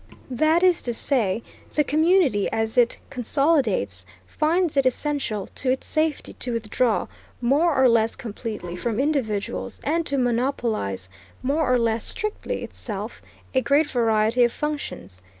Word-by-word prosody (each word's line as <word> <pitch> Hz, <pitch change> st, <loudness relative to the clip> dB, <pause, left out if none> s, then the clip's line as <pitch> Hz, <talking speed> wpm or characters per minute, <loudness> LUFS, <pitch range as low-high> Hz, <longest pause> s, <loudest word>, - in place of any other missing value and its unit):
That 310 Hz, +7 st, +3 dB
is 365 Hz, -2 st, +4 dB
to 235 Hz, -, 0 dB
say, 230 Hz, -5 st, +1 dB, 0.3 s
the 300 Hz, -, +4 dB
community, 310 Hz, -, +3 dB
as 225 Hz, 0 st, -1 dB
it 240 Hz, -2 st, +3 dB
consolidates, 245 Hz, -, +1 dB, 0.2 s
finds 325 Hz, -, +1 dB
it 275 Hz, -2 st, +4 dB
essential 255 Hz, -7 st, -1 dB
to 260 Hz, -, -1 dB
its 260 Hz, +1 st, 0 dB
safety 310 Hz, -1 st, -1 dB
to 245 Hz, -, -1 dB
withdraw, 230 Hz, +1 st, 0 dB, 0.3 s
more 285 Hz, +6 st, +2 dB
or 265 Hz, -1 st, +5 dB
less 230 Hz, -1 st, +3 dB
completely, 215 Hz, -5 st, -6 dB
from 225 Hz, +4 st, -2 dB
individuals, 260 Hz, -8 st, -1 dB
and 330 Hz, +3 st, +1 dB
to 280 Hz, -, -1 dB
monopolize, 235 Hz, -, 0 dB, 0.4 s
more 280 Hz, +1 st, +1 dB
or 250 Hz, -, +5 dB
less 230 Hz, -1 st, 0 dB
strictly, 425 Hz, -1 st, -3 dB
itself, -, -, -6 dB, 0.3 s
a 260 Hz, -, +3 dB
great 290 Hz, +3 st, +2 dB
variety 225 Hz, 0 st, +3 dB
of 240 Hz, -, +3 dB
functions. 290 Hz, -, -5 dB
250 Hz, 140 wpm, -24 LUFS, 225-295 Hz, 0.4 s, or